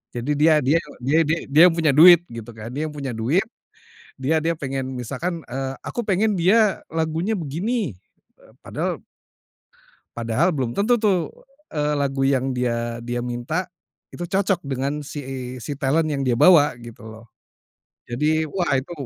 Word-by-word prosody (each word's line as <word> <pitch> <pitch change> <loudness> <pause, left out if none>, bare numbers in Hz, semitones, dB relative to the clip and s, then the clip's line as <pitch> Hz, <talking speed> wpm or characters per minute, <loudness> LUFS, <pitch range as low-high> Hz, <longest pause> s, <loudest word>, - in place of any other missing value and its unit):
jadi 120 +4 -2
dia 155 +2 +4
dia 145 +6 +3 0.2
dia 145 +5 +3
dia 165 +2 +1
dia 145 +3 +4
yang 165 - +1
punya 160 -3 +2
duit 175 +2 +8
gitu 115 0 -8
kan, 110 0 -8
dia 150 - -2
yang - - -7
punya 140 -3 -4
duit, 130 - +1 0.7
dia 140 +5 +1
dia 165 +2 0
pengen 135 -2 -4
misalkan, 150 +8 -4
eee, 135 +1 -3
aku 240 - -3
pengen 210 +2 +1
dia 200 +3 +3
lagunya 160 +5 -1
begini, 185 - -2 0.5
eee, - - -20
padahal - - -3 1.1
padahal 115 +10 +1
belum 130 -7 -2
tentu 225 +4 +2
tuh, 190 -7 +1 0.4
eee, 150 -1 -1
lagu 140 -1 -1
yang 135 -1 +1
dia 120 -2 -2
dia 120 +1 -4
minta 125 +9 -3 0.5
itu 175 0 -6
cocok 195 0 +1
dengan 140 +2 -2
si 145 - -6 0.4
si - - -5
talent 155 +4 +1
yang 140 - -2
dia 120 - +2
bawa 150 0 +6
gitu 115 -1 -11
loh. 110 +1 -13 0.8
Jadi 155 +6 0
wah 175 +3 -2
itu 130 +6 -6
150 Hz, 160 wpm, -22 LUFS, 125-170 Hz, 1.1 s, duit